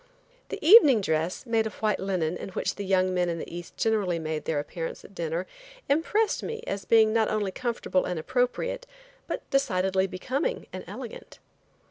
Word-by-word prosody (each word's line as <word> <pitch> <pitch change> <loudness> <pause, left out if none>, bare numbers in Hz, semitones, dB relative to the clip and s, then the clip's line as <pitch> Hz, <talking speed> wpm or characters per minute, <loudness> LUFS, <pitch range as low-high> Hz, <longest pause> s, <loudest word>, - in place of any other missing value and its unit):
The 415 - -4
evening 305 - +9
dress, 160 +3 -1
made 225 -2 +1
of 220 - -8
white 215 -1 0
linen, 180 -4 -1
in - - -6
which 185 - -2
the 200 - -6
young 185 -1 +2
men 180 -1 +1
in 170 - -2
the 165 - -7
East 175 0 -9
generally 205 -6 +1
made 155 -1 -3
their 160 - 0
appearance 165 +3 -5
at - - -14
dinner, 170 0 -2 0.4
impressed 395 +9 +1
me 455 0 -5
as 195 -2 -4
being 220 0 +5
not 225 -1 +2
only 205 -3 -1
comfortable 230 -5 -1
and 180 - -2
appropriate, 265 - -1 0.4
but - - -4
decidedly 190 -8 +2
becoming 270 - -2
and - - -6
elegant. - - -9
195 Hz, 175 wpm, -27 LUFS, 180-250 Hz, 0.4 s, evening